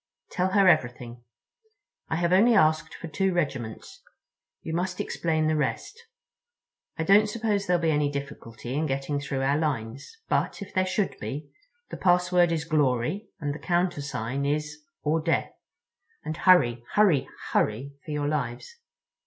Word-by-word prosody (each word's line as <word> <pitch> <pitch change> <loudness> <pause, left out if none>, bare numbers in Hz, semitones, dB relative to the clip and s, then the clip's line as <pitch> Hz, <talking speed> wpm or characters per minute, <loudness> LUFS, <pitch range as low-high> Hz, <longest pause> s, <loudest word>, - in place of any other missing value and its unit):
Tell 185 0 0
her 200 -2 +5
everything. 120 -6 +1 0.9
I - - 0
have 170 +1 +1
only 225 +5 +5
asked 155 -5 +2
for - - -8
the 160 - -10
two 190 +4 +1
regiments; 135 - -3 0.6
you 160 - -4
must 180 +2 -2
explain 160 -2 -1
the 155 0 +2
rest. 420 - -3 0.9
I 160 - -1
don't 205 +4 +5
suppose 210 -2 -1
there'll 175 -1 +2
be 160 - +3
any 145 -1 +1
difficulty 140 -4 -7
in 155 +3 0
getting 135 +1 -2
through 140 -1 -3
our 140 +2 +2
lines, 135 - -3
but, - - 0
if 200 -1 -9
there 185 0 +1
should 195 +1 -1
be, 140 +8 -6 0.4
the - - -5
password 180 -1 +3
is 160 -1 -1
'Glory' 150 - 0
and 145 -3 -2
the 150 - -8
countersign 145 -8 -1
is 150 +1 -2 0.2
'or 155 +2 +1
Death.' 165 +1 0 0.7
And 155 - -3
hurry, 120 -11 +4
hurry, 190 -10 +4 0.2
hurry 130 +7 0
for 175 - -13
your 150 -1 -1
lives!" 140 - -3
155 Hz, 155 wpm, -26 LUFS, 140-180 Hz, 0.9 s, her